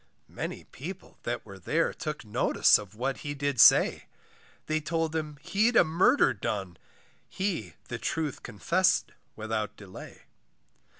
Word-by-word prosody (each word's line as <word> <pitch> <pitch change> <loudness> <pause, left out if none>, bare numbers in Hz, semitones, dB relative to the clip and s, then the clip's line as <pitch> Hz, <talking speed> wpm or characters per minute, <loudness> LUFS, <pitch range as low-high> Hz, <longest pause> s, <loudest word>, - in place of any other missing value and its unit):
Many - - -5
people 180 +8 -10
that 120 0 -4
were 100 -2 -11
there, 160 - 0
Took 150 -5 -5
notice 105 - +3
of 105 -1 -11
what 130 +4 -2
he 145 0 -5
did 140 -2 -2
say, - - +6 0.6
They 155 0 0
told 160 +1 -2
him 150 -2 -3
he'd 220 +4 +1
a - - +7
murder 175 - +3
done, 95 -5 -4 0.5
He 165 - -3
the - - -5
truth 155 -4 -3
confess'd 185 - +1 0.2
without 110 -1 -3
delay. 100 -3 -11
145 Hz, 135 wpm, -28 LUFS, 110-165 Hz, 0.6 s, a